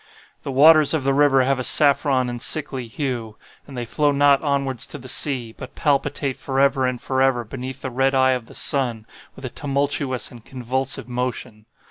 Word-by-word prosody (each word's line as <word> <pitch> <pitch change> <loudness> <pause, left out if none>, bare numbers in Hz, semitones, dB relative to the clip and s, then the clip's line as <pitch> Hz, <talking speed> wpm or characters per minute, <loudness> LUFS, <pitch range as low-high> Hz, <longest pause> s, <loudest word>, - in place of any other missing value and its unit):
"The 140 - -5
waters 155 +3 +6
of 150 - -2
the 135 0 +1
river 135 -2 +4
have 135 0 0
a - - -2
saffron 140 -2 +3
and 120 -1 -5
sickly 135 -5 -3
hue; 115 -3 -4 0.3
and 135 -3 -10
they 120 - -3
flow 145 +5 +1
not 140 -1 +3
onwards 140 -4 -1
to - - -7
the 130 -2 -12
sea, 130 -4 0
but 130 - -11
palpitate 140 -2 -1
forever 135 -1 +1
and 125 -1 -3
forever 130 -2 0
beneath 130 +3 -7
the 130 - -4
red 135 +2 +1
eye 130 0 +4
of 125 -3 -3
the - - -14
sun 120 -6 0 0.3
with 135 - -10
a - - -4
tumultuous 140 -1 -2
and 120 -2 -13
convulsive 130 +2 -3
motion. 125 -3 -5
130 Hz, 185 wpm, -21 LUFS, 125-140 Hz, 0.3 s, waters